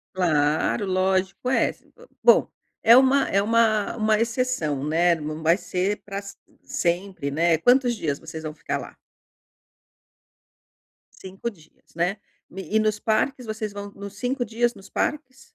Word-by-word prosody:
Claro, 155 +2 +1
lógico 190 +4 0
essa, 265 - 0
hã, - - -16 0.2
bom, 480 - +5 0.3
é 230 +2 +8
uma 270 +1 +4
é 200 +1 +2
uma 220 -1 +2
uma 215 -1 +2
exceção, 225 - -1
né, 170 +3 +3
não 155 0 -6
vai 165 +2 +4
ser 190 +2 -2
pra 195 -1 -7
s 200 0 -8 0.3
sempre 175 -4 -2
né, 165 +2 +2
quantos 245 - +3
dias 150 -10 -2
vocês 160 -1 -8
vão 155 -1 -6
ficar - - -3
lá? - - -10 2.3
5 190 +5 -5
dias, 165 -8 -23
né, 175 +4 0 0.3
e 195 +3 -4
e - - +6
nos 215 -1 +1
parques 235 +4 0
vocês 215 -1 -4
vão 205 0 -7
nos 200 0 -9
5 250 +1 -1
dias, 240 +2 0
nos 195 -1 -14
parques? 270 -3 -3
200 Hz, 150 wpm, -24 LUFS, 170-230 Hz, 2.3 s, é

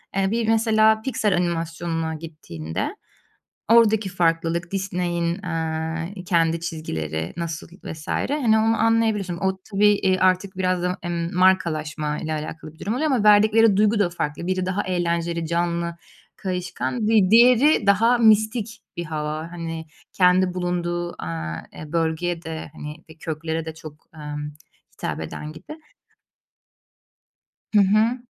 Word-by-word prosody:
eee, 195 0 +1
bir 230 -1 0
mesela 220 -1 +4
piksel 220 -5 0
animasyonuna 165 -1 -2
gittiğinde, 150 - -5 0.7
oradaki 220 -3 +5
farklılık, 170 -1 0
Disney'in, 175 -3 -1
eee, 165 +2 -3
kendi 165 -2 +2
çizgileri 80 - -4
nasıl 170 -1 -4 0.2
vs. 155 -1 -8
hani, 250 -6 +1
onu 225 +1 +2
anlayabiliyorsun. 220 -5 +1
O 190 0 -1
tabii, 205 +1 +4
iii, 190 -2 +1
artık 185 +1 +2
biraz 185 -1 0
da, 180 +1 -1
emm, 170 -1 -3
markalaşma 155 -5 +1
ile 160 - -4
alakalı 155 0 -6
bir - - -22
durum 205 +4 -2
oluyor 305 +5 0
ama 240 -6 +1
verdikleri 215 0 +6
duygu 210 +1 +3
da 195 -4 +2
farklı. 170 -1 -4
Biri 185 0 -1
daha 190 +2 -1
eğlenceli, 170 -2 -1
canlı, 170 0 -1 0.4
kayışkan, 185 +5 -3
di 210 -4 +4
diğeri 245 +2 +6
daha 230 +5 +4
mistik 220 0 +3 0.2
bir 170 - -3
hava, 155 +1 -4
hani, 165 -2 -5 0.3
kendi 180 0 +3
bulunduğu, 175 -1 -2
aaa, 80 -1 -4
eee, 155 0 -10
bölgeye 165 +1 -1
de, 160 -2 -6
hani, 150 0 -7
eee, 160 - -14
köklere 160 0 -3
de 160 -1 -6
çok, 155 -2 -12
emm, 150 -1 -6 0.4
hitap - - -4
eden 150 - -6
gibi. 160 - -10 2.0
Hı 210 - +6
hı. 215 +5 +3
175 Hz, 135 wpm, -23 LUFS, 160-205 Hz, 2.0 s, verdikleri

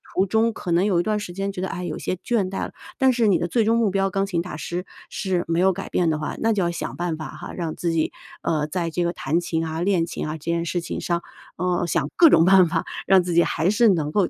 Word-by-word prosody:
途 190 - +3
中 220 +3 +2
可 180 - -5
能 175 +3 +3
有 185 -4 +2
一 - - +1
段 215 +1 0
时 180 -4 -7
间 195 +2 -2
觉 195 - -7
得， 190 - -1
哎， 180 0 -5
有 160 - -4
些 - - -2
倦 195 0 -1
怠 195 - -3
了， - - -8 0.3
但 265 -1 +4
是 235 -2 +2
你 195 - +4
的 175 - -2
最 230 +5 +2
终 225 +1 +3
目 230 -3 +2
标 195 0 +1
钢 195 +1 0
琴 180 -4 -1
大 175 -2 -7
师 175 +4 -4 0.2
是 185 -3 -1
没 165 +1 0
有 190 +1 +4
改 195 - -6
变 175 -2 +1
的 155 - 0
话， 150 - -4
那 225 - +2
就 200 -3 +1
要 170 - 0
想 170 - -5
办 175 -2 -2
法 155 -3 -6
哈， - - -9
让 165 -3 -4
自 170 - -1
己， 160 -1 0 0.3
呃， 155 -2 0
在 170 +1 -2
这 175 +2 -1
个 170 - 0
弹 155 +2 0
琴 165 -2 -2
啊、 160 +1 -3
练 180 -2 +2
琴 170 - -5
啊， 155 - -3
这 155 -1 -10
件 170 0 0
事 175 +1 -1
情 - - -5
上， 170 -1 -1 0.4
呃， 180 0 0
想 150 -4 0
各 335 -2 +7
种 165 - +6
办 190 -1 +6
法， 165 +1 -1 0.2
让 190 -1 +6
自 175 0 -2
己 170 +1 +5
还 165 +4 0
是 225 +3 +4
能 155 -6 +1
够 200 -1 +2
175 Hz, 310 characters per minute, -23 LUFS, 170-195 Hz, 0.4 s, 各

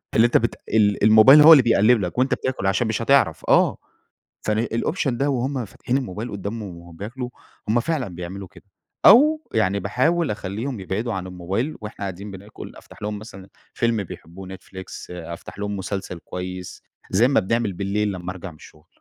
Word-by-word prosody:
اللي 115 - +6
أنت 120 - +4
بت 120 - -1
ال 105 -2 +2
الموبايل 110 +7 +8
هو 160 +2 +9
اللي 135 -5 +7
بيقلِّب 115 0 +4
لك 90 +5 -4
وأنت 130 +1 +2
بتاكل 130 -7 -2
عشان 100 +4 +1
مش 110 +1 -2
هتعرف، 115 - +2
آه، - - +4 0.6
فن 110 +2 0
الoption 130 - -1
ده 135 +4 0
وهم 130 -1 -1
فاتحين 120 +6 -2
الموبايل 115 -2 -5
قدامهم 100 -2 -6
وبياكلوا، 105 +9 -7 0.4
هم 120 +2 +3
فعلًا 145 -4 -2
بيعملوا 90 +2 -7
كده، - - -18 0.4
أو 300 +8 +7
يعني 100 +2 +1
باحاول 150 - +1
أخلِّيهم 105 +5 -4
يبعدوا 105 +5 -3
عن 95 -1 -4
الموبايل 95 - -3
وإحنا 105 0 -8
قاعدين 100 +2 -6
بناكل، 100 +3 -10
أفتح - - -16
لهم 105 0 -4
مثلًا 100 -3 -12 0.2
فيلم 115 -3 0
بيحبوه 90 +1 -10
Netflix 95 0 -10 0.3
أفتح 85 +2 -8
لهم 105 -1 -3
مسلسل 95 -2 -5
كويس، 90 +1 -7 0.3
زي 110 +7 +4
ما 135 - +3
بنعمل 110 0 -1
بالليل 100 +2 -1
لمَّا 90 -1 -5
أرجع 95 0 -8
من - - -16
الشغل. 75 0 -17
105 Hz, 175 wpm, -22 LUFS, 95-120 Hz, 0.6 s, هو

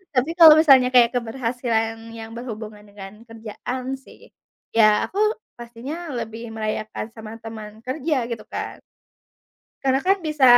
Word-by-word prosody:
Tapi 255 +5 +2
kalau 320 -2 +11
misalnya 265 -5 +6
kayak 245 0 +6
keberhasilan 230 -1 -1 0.2
yang 225 0 -8
berhubungan 215 -3 -7
dengan 195 -1 -10 0.2
kerjaan 225 +3 -6 0.2
sih, - - -16 0.6
ya 215 -2 +5
aku 390 - -9 0.4
pastinya 240 +4 -8 0.2
lebih 225 0 -6
merayakan 215 0 -3
sama 220 -1 -9
teman 220 -1 -9
kerja 295 +4 -1
gitu 235 - -5
kan. - - -4 1.1
Karena 265 0 +2
kan 390 - +5
bisa, 300 -3 +1
230 Hz, 130 wpm, -22 LUFS, 220-260 Hz, 1.1 s, kalau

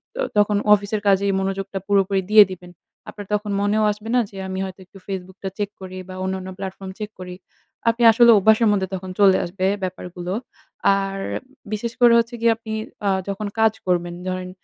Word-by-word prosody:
ত - - -10 0.2
তখন 205 0 +3 0.2
অফিসের 205 +1 0
কাজেই 200 0 +3
মনোযোগটা 195 0 -3
পুরোপুরি 195 -1 +2
দিয়ে 215 -1 +9
দিবেন। 180 -1 -10 0.4
আপনার 205 -1 -9
তখন 210 0 -1
মনেও 210 +1 +2
আসবে 210 +2 -8
না 250 - +5
যে 195 - -12
আমি 190 0 -4
হয়তো 190 0 -9
একটু 195 - -17
Facebook 190 0 -6
টা 190 - -2
চেক 205 -1 -2
করি 185 0 -8
বা - - -7
অন্যান্য 190 0 -3
platform 190 0 -6
চেক 210 0 -4
করি। 180 0 -7 0.5
আপনি 230 +1 0
আসলে 235 +1 +6
অভ্যাসের 220 +3 +4
মধ্যে 190 -2 0
তখন 185 0 -7
চলে 195 -2 +6
আসবে 185 +2 -3 0.2
ব্যাপারগুলো। 180 0 -5 0.6
আর 195 0 -3 0.6
বিশেষ 230 +2 -3
করে 240 -1 +7
হচ্ছে 230 +1 -2
গিয়ে 230 - +4
আপনি 220 -1 -7 0.3
আ - - +4 0.2
যখন 205 +1 -3
কাজ 220 -1 +4
করবেন 175 -1 0
ধরেন 185 0 -3
195 Hz, 185 wpm, -22 LUFS, 185-210 Hz, 0.6 s, দিয়ে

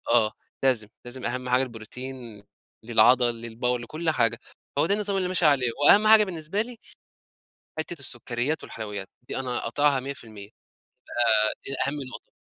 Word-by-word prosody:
آه، 110 -2 +4 0.3
لازم، 120 -6 +2 0.2
لازم 125 +1 -7
أهم 125 +1 -3
حاجة 125 +2 +3
البروتين 120 -1 -8 0.4
للعضل 120 +1 +4
للباور 120 +2 -2
لكل 155 +8 -3
حاجة، 115 -4 +1 0.4
هو - - +4
ده 200 - +3
النظام 205 -1 0
اللي 185 -1 0
ماشي 180 -2 +2
عليه، 135 -4 +4 0.2
وأهم 210 +5 +7
حاجة 220 -1 +8
بالنسبة 175 +1 -2
لي 240 +1 -6 1.0
حِتّة 155 - -1
السُّكّرِيّات 125 +3 0
والحلويّات، 105 -3 -6 0.2
دي - - -3
أنا 125 -2 -2
قاطعها 140 +3 +1
100% 110 -7 -8 1.0
آآ - - +1 0.2
دي 135 - -4
أهم 140 - -2
نقطة. - - -10
125 Hz, 150 wpm, -25 LUFS, 115-155 Hz, 1.0 s, حاجة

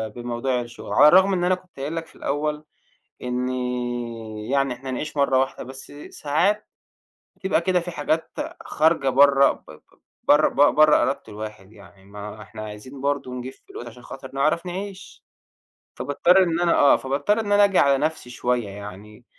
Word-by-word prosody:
بموضوع 120 +1 -2
الشُغل، 120 -1 -8
على - - +7
الرغم 190 +4 +6
إن 180 -2 0
أنا 180 +1 +3
كنت 185 -5 -18
قايل 145 +4 -4
لك 165 0 -4
في - - -21
الأول 150 +1 -2 0.6
إنّي 120 -3 -3
يعني 135 -2 +1
إحنا 130 +2 -8
نعيش 145 +4 -5
مرّة 140 -2 +3
واحدة، 130 0 -1
بس 130 +2 -10 0.2
ساعات 175 +9 0 0.7
بتبقى 190 -3 0
كده 180 +1 +2
في 175 +1 -6
حاجات 155 +1 -1 0.3
خارجة 155 -3 +2
برّه 140 +1 +5
ب - - -12
ب - - -14 0.5
برّه 150 +1 +5
ب 145 - +3
برّه 155 0 +6
إرادة - - +1
الواحد 105 -2 -9
يعني 100 -2 -17
ما 105 +1 -9
إحنا 110 +1 -10
عايزين 110 +6 -9
برضه 140 -2 -1
نجيب 125 +1 -6
فلوس 120 - -11
عشان 120 +1 -12
خاطر 135 -1 -10
نعرف 155 +5 +1
نعيش، 190 +2 -7 0.7
فباضطر 175 +6 +3
إن 170 -2 0
أنا 175 -1 +3
آه، 140 - +6
فباضطر 140 +11 0
إن 205 -2 -2
أنا 205 0 +6
آجي 195 -2 +2
على 140 -1 +4
نَفْسي 155 -4 -2
شوية 125 -2 -1
يعني، 105 +3 -10
135 Hz, 170 wpm, -23 LUFS, 120-160 Hz, 0.7 s, على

